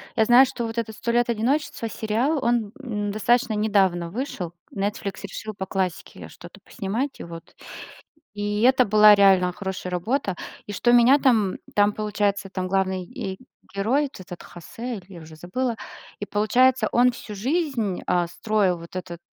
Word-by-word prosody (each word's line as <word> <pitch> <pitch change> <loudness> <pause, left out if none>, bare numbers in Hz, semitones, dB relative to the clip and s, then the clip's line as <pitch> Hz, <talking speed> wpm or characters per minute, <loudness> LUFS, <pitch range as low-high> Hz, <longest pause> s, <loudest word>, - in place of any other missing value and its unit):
Я 220 - +3
знаю, 245 +4 +7
что 240 -2 -4
вот 225 +1 -6
этот 220 -2 -3
"Сто 235 - -2
лет 240 0 +2
одиночества" 235 +1 -1
сериал, 235 +9 0
он, 235 -3 +1
м, 210 -5 -3
достаточно 230 +3 +1
недавно 190 -5 +1
вышел, 190 - -5 0.2
"Нетфликс" 200 0 -4
решил 215 +2 -6
по 190 - -3
классике 190 -1 -4
что-то - - -13
поснимать, 235 +8 -4
и - - -6
вот, 165 -1 -11 0.8
и 205 +1 -2
это 255 0 +5
была 210 0 +7
реально 190 -3 +4
хорошая 190 -1 -5
работа. 195 +2 -1 0.3
И 205 - -6
что 240 +4 +2
меня 245 +4 +6
там 225 -9 +2 0.2
там 205 0 +4
получается 205 -2 -1
там 185 -1 -3
главный 190 -1 0
ге 190 +2 -6 0.4
герой, 230 +9 +1
вот 275 -9 -6
этот 175 -1 -9
Хосе, 230 +8 -7
или 185 - -10
я 170 - -10
уже 155 0 -13
забыла, 225 +9 -3 0.4
и 205 - -4
получается, 220 +3 +3
он 245 +1 +5
всю 215 -3 -9
жизнь, 250 - -1
а, 175 -1 +1
строил, 195 -2 0
вот 170 +2 -12
этот, 180 -2 -6
210 Hz, 170 wpm, -24 LUFS, 190-240 Hz, 0.8 s, знаю